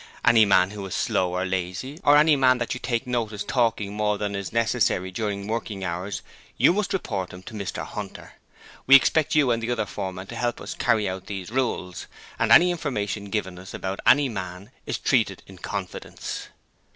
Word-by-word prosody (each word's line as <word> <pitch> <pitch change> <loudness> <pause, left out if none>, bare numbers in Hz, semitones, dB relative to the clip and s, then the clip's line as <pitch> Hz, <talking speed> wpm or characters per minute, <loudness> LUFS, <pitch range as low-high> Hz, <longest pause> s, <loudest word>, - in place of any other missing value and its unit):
Any 110 -2 +6
man 95 -1 +4
who 105 -1 -7
is 95 - -4
slow 90 -1 0
or 90 +1 0
lazy, 95 - -3
or 145 0 +6
any 150 0 +6
man 130 -2 +4
that 120 -2 -2
you 125 - -5 0.3
notice 110 -4 -2
talking 110 -3 0
more 105 0 0
than 105 0 -3
is 100 -1 -4
necessary 115 -5 +1
during 100 0 -3
working 110 -3 -3
hours, 90 +1 -4 0.3
you - - +5
must 210 +1 -1
report 100 - -2
him 90 +1 -11
to 115 - -10
Mr 100 -3 -4
Hunter. - - -8 0.5
We 135 - +10
expect 155 +3 +4
you 145 -5 +4
and 115 -1 0
the 115 - -3
other 120 -3 0
foremen 95 -1 -5
to 115 - -9
help 120 0 -1
us - - -7
to - - -5
carry 110 -3 +3
out 95 0 -5
these 95 0 -6
rules, 115 -8 -2 0.3
AND - - +1
ANY 180 +1 +8
INFORMATION 105 - -3
GIVEN 95 -3 -3
US 95 +1 -9
ABOUT 95 +1 -4
ANY 145 +1 +6
MAN 95 -3 -6 0.2
IS - - -1
TREATED - - +1
IN 95 -2 -14
CONFIDENCE. 95 -1 -6
105 Hz, 195 wpm, -25 LUFS, 95-120 Hz, 0.5 s, We